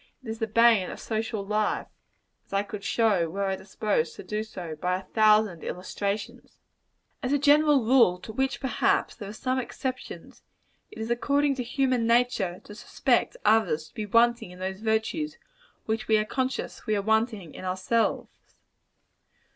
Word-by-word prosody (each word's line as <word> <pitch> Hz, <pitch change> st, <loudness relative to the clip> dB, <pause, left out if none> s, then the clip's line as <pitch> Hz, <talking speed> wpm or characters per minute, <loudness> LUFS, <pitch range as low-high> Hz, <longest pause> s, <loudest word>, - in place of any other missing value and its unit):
It 235 Hz, -, -8 dB
is 220 Hz, 0 st, -5 dB
the 225 Hz, -, -1 dB
bane 225 Hz, -3 st, +4 dB
of -, -, -8 dB
social 220 Hz, -2 st, -3 dB
life 210 Hz, +1 st, 0 dB, 0.6 s
as -, -, -14 dB
I 195 Hz, +1 st, +2 dB
could 205 Hz, -1 st, -8 dB
show, 205 Hz, -7 st, +2 dB
were 200 Hz, +4 st, -3 dB
I 195 Hz, -1 st, 0 dB
disposed 190 Hz, -4 st, -2 dB
to -, -, -9 dB
do 210 Hz, 0 st, -3 dB
so, 180 Hz, -7 st, -7 dB
by 180 Hz, +4 st, -1 dB
a 190 Hz, -, -9 dB
thousand 215 Hz, -5 st, +3 dB
illustrations. 200 Hz, +3 st, -4 dB, 0.6 s
As 255 Hz, -1 st, -2 dB
a 285 Hz, -, +4 dB
general 290 Hz, -2 st, +4 dB
rule 235 Hz, -7 st, +5 dB
to 220 Hz, -, -8 dB
which, 265 Hz, +3 st, -1 dB
perhaps, 265 Hz, -, +1 dB
there 205 Hz, -3 st, -8 dB
are -, -, -7 dB
some 255 Hz, +4 st, -1 dB
exceptions 255 Hz, +1 st, -6 dB, 0.5 s
it -, -, -14 dB
is 220 Hz, +1 st, -4 dB
according 280 Hz, +4 st, +2 dB
to 260 Hz, -2 st, -3 dB
human 250 Hz, -1 st, 0 dB
nature 230 Hz, -7 st, +1 dB
to 210 Hz, -, -11 dB
suspect 235 Hz, -, 0 dB
others 160 Hz, -8 st, +2 dB
to -, -, -31 dB
be 215 Hz, -1 st, -5 dB
wanting 235 Hz, -1 st, +3 dB
in 180 Hz, -, -12 dB
those 190 Hz, +1 st, -4 dB
virtues 225 Hz, +8 st, -1 dB, 0.5 s
which 220 Hz, +1 st, -2 dB
we 220 Hz, -, +4 dB
are 215 Hz, -, +1 dB
conscious 260 Hz, +1 st, -3 dB
we 215 Hz, -, +2 dB
are 200 Hz, -, -1 dB
wanting 220 Hz, -5 st, 0 dB
in -, -, -9 dB
ourselves. 185 Hz, +5 st, -2 dB
220 Hz, 170 wpm, -27 LUFS, 195-240 Hz, 0.6 s, rule